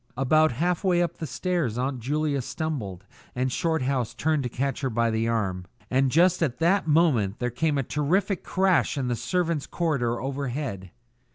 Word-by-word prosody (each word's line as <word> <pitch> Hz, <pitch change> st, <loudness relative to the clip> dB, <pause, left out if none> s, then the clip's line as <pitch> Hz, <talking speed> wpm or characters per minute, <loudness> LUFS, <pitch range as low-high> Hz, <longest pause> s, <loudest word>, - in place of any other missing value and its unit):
About 155 Hz, +2 st, +3 dB
half 175 Hz, -, 0 dB
way 180 Hz, -2 st, +3 dB
up 170 Hz, -1 st, -3 dB
the 160 Hz, -, -5 dB
stairs 135 Hz, -2 st, -1 dB
Aunt 130 Hz, +1 st, -1 dB
Julia 145 Hz, +3 st, -1 dB
stumbled 115 Hz, -, -4 dB, 0.3 s
and 130 Hz, +1 st, 0 dB
Shorthouse 135 Hz, -6 st, -1 dB
turned 155 Hz, -1 st, +1 dB
to 125 Hz, -, -3 dB
catch 135 Hz, +3 st, -2 dB
her 135 Hz, -, 0 dB
by 115 Hz, 0 st, +1 dB
the 110 Hz, +1 st, 0 dB
arm, 95 Hz, -6 st, -1 dB, 0.3 s
and 130 Hz, +1 st, +3 dB
just 175 Hz, +6 st, +3 dB
at 130 Hz, -7 st, 0 dB
that 175 Hz, +2 st, +2 dB
moment 145 Hz, -, +3 dB
there 125 Hz, 0 st, -2 dB
came 150 Hz, +4 st, 0 dB
a 135 Hz, -, +1 dB
terrific 175 Hz, -, 0 dB
crash 185 Hz, -5 st, +2 dB
in 130 Hz, -2 st, -1 dB
the 120 Hz, -, 0 dB
servants' 170 Hz, -, -1 dB
corridor 130 Hz, -9 st, -1 dB
overhead. 135 Hz, -7 st, -4 dB
140 Hz, 175 wpm, -26 LUFS, 120-160 Hz, 0.3 s, About